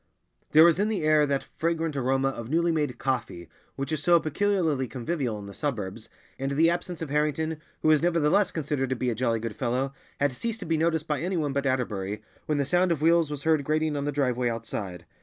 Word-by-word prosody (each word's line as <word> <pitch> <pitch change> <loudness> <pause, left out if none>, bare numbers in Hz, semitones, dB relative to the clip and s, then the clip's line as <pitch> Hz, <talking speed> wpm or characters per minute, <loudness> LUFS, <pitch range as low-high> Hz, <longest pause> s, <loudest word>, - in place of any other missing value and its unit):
There 155 +1 +7
was 170 +1 +5
in 205 - +2
the 200 -7 -1
air 155 -1 +4
that 140 -1 -1
fragrant 165 -2 0
aroma 135 0 +1
of 120 -3 -6
newly 170 +3 +2
made 150 -6 -1
coffee 120 -11 -3 0.3
which 135 +1 -4
is 155 -3 -1
so 170 +2 +5
peculiarly 160 -4 0
convivial 125 -1 -3
in 100 - -8
the 100 - -9
suburbs, 110 -6 -4 0.3
and 135 +1 -1
the 165 +4 +4
absence 175 -1 -3
of 150 - -6
Harrington, 150 +1 0 0.2
who 155 - +4
was 155 -2 +5
nevertheless 170 +3 +3
considered 145 -4 -2
to 130 - 0
be 125 0 -1
a - - 0
jolly 115 -1 0
good 110 -2 -5
fellow, 130 +2 -1 0.3
had 145 0 +2
ceased 225 - -4
to - - -5
be 165 - +1
noticed 160 0 0
by 150 -1 -1
anyone 165 -5 -1
but 140 0 0
Atterbury, 105 -6 -2 0.2
when 150 - +1
the 140 - +1
sound 175 +4 +2
of 155 -3 -1
wheels 165 -1 +4
was 145 -2 -5
heard 160 -2 +3
grating 155 +1 0
on 140 0 -2
the 145 - 0
driveway 125 -4 0
outside. 110 -5 -5
145 Hz, 220 wpm, -27 LUFS, 130-160 Hz, 0.3 s, There